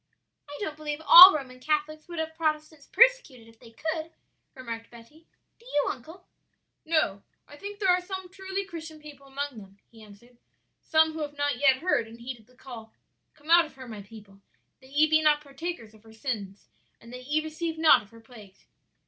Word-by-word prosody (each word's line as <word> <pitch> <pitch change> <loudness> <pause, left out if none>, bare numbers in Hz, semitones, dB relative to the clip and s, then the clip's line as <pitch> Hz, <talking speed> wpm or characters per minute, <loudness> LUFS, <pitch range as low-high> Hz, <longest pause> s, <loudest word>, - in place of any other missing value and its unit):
"I 290 - -8
don't 310 -7 -4
believe 300 -1 -5
all 365 +3 +12
Roman 260 -5 -6
Catholics 305 +2 -2
would 345 -1 -9
have 320 0 -3
Protestants 310 -2 -3
persecuted 480 - +3
if 225 0 -20
they 235 - -16
could," 315 +7 -5 0.4
remarked 230 -3 -8
Betty. 240 +8 -17 0.3
"Do 465 - -23
you, 295 -11 0
uncle?" 320 +9 -12 0.6
"No; 310 -12 0 0.3
I 290 - -14
think 405 +6 -9
there 395 -2 0
are 360 0 +2
some 375 0 -7
truly 385 +1 -5
Christian 325 -4 -10
people 290 -2 -14
among 275 -3 -5
them," 195 -1 -16
he 225 -1 -17
answered; 220 +4 -18 0.4
"some 320 0 +2
who 320 - -7
have 290 -1 -6
not 285 -2 -1
yet 270 0 +3
heard 245 -11 +1
and 230 +1 -14
heeded 235 -2 -9
the 250 - -25
call, 235 -4 -12 0.4
'Come 305 +2 -8
out 340 0 +7
of 305 - -20
her, 260 -1 -11
my 215 -3 -8
people, 200 -1 -16 0.4
that 260 - -19
ye 295 +3 +3
be 315 0 +3
not 300 -1 +3
partakers 280 -4 -8
of 215 - -20
her 220 0 -18
sins, 215 -5 -6 0.3
and 235 +1 -15
that 250 0 -10
ye 300 +2 +1
receive 320 +1 -5
not 320 -1 +5
of 205 - -19
her 230 0 -17
plagues.' 215 -5 -17
290 Hz, 200 wpm, -27 LUFS, 235-320 Hz, 0.6 s, all